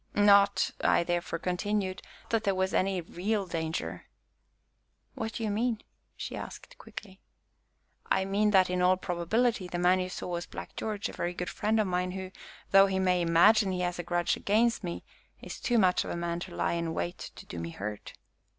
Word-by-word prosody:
"Not," 200 -1 +5
I - - +4
therefore 175 -1 -2
continued, 185 +2 -2 0.3
"that 225 -1 +1
there 195 -1 +1
was 190 0 0
any 190 -1 +1
real 195 +5 -2
danger." 165 -2 -4 1.1
"What 225 0 -4
do 230 - -4
you 215 - 0
mean?" 225 +1 -1 0.3
she - - -5
asked - - -8
quickly. 190 -2 -10 0.9
"I 190 - +2
mean 205 +2 +2
that, 190 -3 +5
in 180 0 -1
all 185 +1 +4
probability, 185 +4 0
the 175 - -4
man 180 +1 +4
you 185 0 -2
saw - - -6
was 175 0 -3
Black - - -8
George, 210 -2 -3
a - - -9
very 175 +1 -3
good 180 0 -4
friend 220 +1 0
of 215 - +3
mine, 180 0 -1
who, 190 -1 -6 0.4
though 195 0 +7
he 190 -1 -1
may 180 -1 +2
imagine 190 +5 +5
he 180 -1 -2
has 175 0 -2
a - - -2
grudge 175 0 0
against 225 +2 +1
me, 175 -1 -4 0.4
is - - -8
too 240 - +1
much 185 -4 +4
of - - -7
a - - -3
man 170 0 -2
to 175 0 -8
lie - - 0
in 170 -1 -2
wait 175 +2 -4
to - - -11
do 85 - -7
me 85 0 -4
hurt." 105 +4 -6
185 Hz, 195 wpm, -29 LUFS, 175-205 Hz, 1.1 s, though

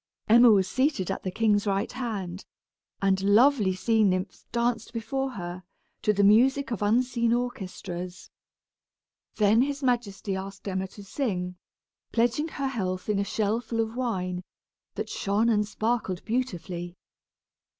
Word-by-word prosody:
Emma 235 +2 +8
was 195 -4 +4
seated 255 - 0
at - - -3
the 185 - -3
king's 210 +1 +2
right 195 0 0
hand, 200 -7 -4 0.6
and 190 -1 +3
lovely 210 0 +4
sea 220 +3 +2
nymphs 185 -1 -1
danced 235 -1 -1
before 270 +4 -2
her, 175 -2 -6 0.4
to 210 - +3
the 200 -1 +2
music 255 +7 +4
of 225 - -3
unseen 235 +2 +2
orchestras. 185 -7 -4 1.0
Then 215 +2 +4
his 280 +1 -1
majesty 225 -6 -1
asked 195 +1 -7
Emma 190 0 -2
to 205 +2 -12
sing, 185 -6 -2 0.6
pledging 240 +7 +1
her 275 -4 -3
health 185 -6 -3
in 205 -1 +2
a - - +2
shell 215 +2 0
full 230 -1 -4
of 225 0 -1
wine, 185 -8 -2 0.5
that - - -3
shone 205 +4 +1
and 210 -2 +2
sparkled 215 -4 -2
beautifully. 180 -7 -3
210 Hz, 140 wpm, -27 LUFS, 190-240 Hz, 1.0 s, Emma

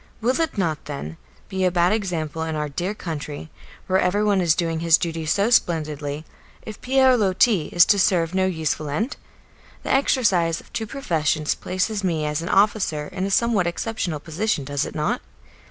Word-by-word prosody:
Will 250 +6 0
it 325 -8 -2
not, 165 -6 -1
then, 80 - -6 0.3
be 190 0 -2
a 185 - +4
bad 175 0 +2
example 165 -7 -2
in 160 -1 -2
our 150 0 -2
dear 180 +8 -3
country, 155 -4 -6 0.3
where 190 0 +2
everyone 200 +1 +2
is 165 -3 +3
doing 165 -2 -1
his 165 0 +5
duty 165 -2 -3
so 200 +8 +2
splendidly, 155 -6 0 0.4
if 215 - -9
Pierre 260 0 +4
Loti 195 -3 +2
is 175 -1 +5
to 205 - +3
serve 175 -3 +2
no 190 0 +2
useful 155 -4 -2
end? 215 - -2 0.7
The - - 0
exercise 195 - +2
of - - -18
two 220 - -3
professions 160 - 0
places 200 +3 -2
me 165 -5 0
as 150 +1 -1
an 170 - -5
officer 195 -7 +1
in 185 - -3
a - - -3
somewhat 210 -3 +2
exceptional 175 -3 -3
position, 165 +1 -2
does 145 0 -1
it - - -8
not? - - -1
175 Hz, 180 wpm, -23 LUFS, 155-205 Hz, 0.7 s, his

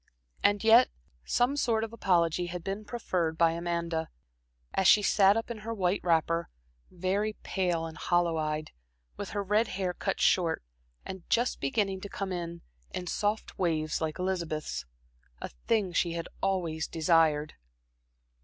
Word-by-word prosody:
And 205 0 +3
yet 230 +3 +7 0.4
some 245 +4 +2
sort 230 -6 +1
of 225 0 -5
apology 175 -5 +2
had 175 -1 -6
been 200 +2 -4
proffered 180 -9 -2
by 165 -1 +4
Amanda, 170 -1 -2 0.6
as 190 - +3
she 210 - +7
sat 200 +1 +5
up 225 +1 -3
in 225 - -5
her 225 +2 -5
white 185 -1 +1
wrapper, 165 0 +1 0.4
very 190 +4 -1
pale 175 -4 0
and 160 -1 -8
hollow 175 -2 +2
eyed, 155 0 -2 0.4
with - - -6
her 205 - -2
red 210 +4 +2
hair 185 -1 -2
cut - - -2
short, 170 - +2 0.4
and 190 -2 -8
just 240 +2 +1
beginning 190 +7 0
to 200 - -7
come 195 -1 -4
in 170 -1 -4 0.3
in 180 - -5
soft 210 +4 -2
waves 160 -4 0
like 155 -1 -2
Elizabeth's 170 - -2 0.5
a - - -5 0.2
thing 205 -6 +2
she 170 0 +1
had 170 -1 -4
always 170 -5 -1
desired. 160 -2 +2
180 Hz, 155 wpm, -29 LUFS, 165-205 Hz, 0.6 s, yet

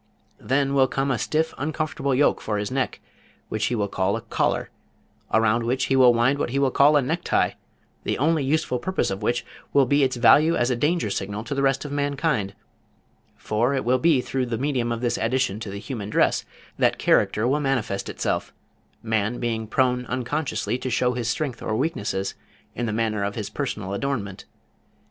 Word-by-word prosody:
Then 135 +1 0
will 135 -1 +4
come 135 +1 -1
a 120 - 0
stiff 160 +1 0
uncomfortable 145 -2 -1
yoke 145 +3 +3
for 105 -1 -2
his 105 +2 -3
neck, 135 0 -2 0.5
which 110 0 -1
he 125 - 0
will 105 -2 0
call 95 +1 0
a - - -6
collar, 115 - -1 0.6
around 110 +1 +3
which 125 +3 0
he - - +4
will 130 -2 +7
wind 120 +4 +2
what - - -1
he 135 - -2
will 140 -1 +2
call 145 +3 +5
a 140 - +2
necktie, 165 +7 +1 0.5
the - - -1
only 155 +2 +2
useful 140 -2 0
purpose 185 - -1
of 95 +2 -4
which 120 +3 0 0.3
will 140 -1 +5
be 140 +3 +2
its 130 -2 +2
value 145 +8 +5
as 120 +1 +1
a - - +1
danger 145 - 0
signal 100 +2 -3
to 120 - -4
the 140 - -1
rest 135 +1 +1
of 145 - -6
mankind, 140 - -1 0.8
for 120 +6 0
it 130 - -2
will 130 +2 +3
be 150 -2 +4
through 130 0 -2
the 115 -1 -2
medium 125 -2 -1
of 115 0 -3
this 120 -1 0
addition 115 -3 0
to 110 -2 -6
the 100 - -6
human 105 -2 -6
dress - - +2 0.3
that - - +3
character 110 +3 +2
will 140 +4 +2
manifest 125 -8 -1
itself, - - -2 0.5
man 110 +1 0
being 115 -2 -2
prone 125 +1 +1
unconsciously 130 0 -2
to 130 - -3
show 125 +1 +1
his 120 -2 -3
strength 130 -2 -2
or 110 - -2
weaknesses 105 - -2 0.4
in 120 - -3
the - - -1
manner 110 -2 -1
of 100 0 -2
his 105 -3 -5
personal 105 -9 -3
adornment. 100 -5 -3
125 Hz, 195 wpm, -24 LUFS, 110-140 Hz, 0.8 s, will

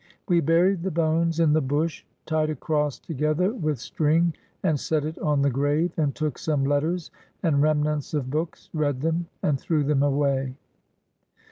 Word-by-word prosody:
We 175 -4 +4
buried 170 +4 +3
the 190 - -1
bones 165 0 +1
in 160 -3 +4
the 155 - +3
bush, 145 +3 -1 0.2
tied 155 -1 0
a 155 - -2
cross 150 0 -1
together 155 - 0
with 155 - -1
string 160 +6 +1 0.3
and 160 -6 +2
set 155 0 0
it 155 +1 -5
on 150 -2 +1
the 140 - +3
grave, 145 +6 +1
and 145 -4 0
took 155 -2 -2
some 150 -3 0
letters 155 +5 0 0.3
and 150 -5 +3
remnants 150 0 +1
of 130 -3 -2
books, 160 +3 -4
read 145 -4 0
them, 165 +2 0 0.2
and 140 -3 +1
threw 155 0 0
them 140 -1 +2
away. 140 -2 +1
155 Hz, 170 wpm, -25 LUFS, 145-165 Hz, 0.3 s, We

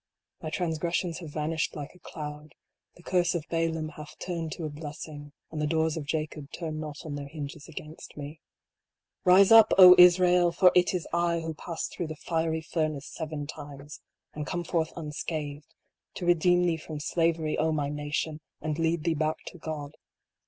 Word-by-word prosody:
My 155 - -4
transgressions 170 +1 -1
have 165 -4 -8
vanished 155 +2 -2
like 145 -1 -7
a 180 - -19
cloud. 150 -2 -8 0.4
The 175 - -17
curse 175 -1 +1
of 160 -3 -2
Balaam 165 -1 0
hath 150 -1 -11
turned 165 -3 -4
to 165 - -5
a - - -2
blessing; 145 -1 -8 0.2
And 155 -1 -3
the 150 - +1
doors 160 0 +1
of 155 -3 -5
Jacob 155 -2 -3
turn 160 -3 -4
not 150 -1 -7
on 155 - -5
their 145 -1 -5
hinges 145 0 -7
against 155 +1 -10
me. 150 +2 -7 0.9
Rise 190 +3 +7
up, 225 -1 +8
O 180 -1 +11
Israel! 180 0 +6
for 180 +2 +5
it 180 +1 +3
is 175 - -3
I 170 -1 +1
who 160 0 -4
passed 165 +2 -5
through 175 - -3
the 155 - -6
fiery 160 0 -1
furnace 155 -3 -2
seven 155 -3 -4
times, 145 -1 -9 0.3
and 150 0 -5
come 175 -1 -2
forth 165 -2 -1
unscathed, 150 -2 -5 0.4
to 180 - -4
re 175 - +6
deem 175 +1 +3
thee 170 -2 +1
from 155 -1 -7
slavery, 165 0 0
O 160 +1 +2
my 145 -2 -1
nation! 150 +1 -3 0.2
and 155 0 -3
lead 165 -1 +1
thee 165 -1 +2
back 155 0 -1
to 180 - -14
God. 150 -2 -5
160 Hz, 185 wpm, -28 LUFS, 150-170 Hz, 0.9 s, O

